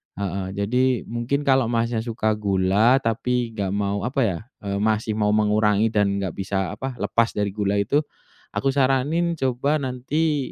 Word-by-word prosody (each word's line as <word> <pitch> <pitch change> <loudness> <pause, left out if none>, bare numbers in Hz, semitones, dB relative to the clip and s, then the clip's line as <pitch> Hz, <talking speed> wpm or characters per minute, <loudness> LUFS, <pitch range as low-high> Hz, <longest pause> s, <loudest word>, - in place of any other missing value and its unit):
heeh, 95 -1 -3
jadi, 125 +5 +1
mungkin 120 +5 -1
kalau 135 -3 +3
Masnya 115 0 0
suka 110 -1 -1
gula, 100 +6 +3
tapi 115 +1 0
enggak 100 -4 -3
mau, 100 +1 -1
apa 135 +2 -1
ya, 95 -7 0 0.2
eee, 100 0 -2
masih 110 +1 0
mau 105 -1 +1
mengurangi 105 0 +2
dan 105 -2 +2 0.2
enggak 95 - -2
bisa, 95 0 -2
apa, 130 +3 -5
lepas 115 -1 0
dari 100 -1 0
gula 100 0 -1
itu, 125 +9 +2 0.6
aku 135 - +1
saranin 145 +6 +2
coba 130 +3 +1
nanti, 140 +3 -1
115 Hz, 160 wpm, -23 LUFS, 100-130 Hz, 0.6 s, kalau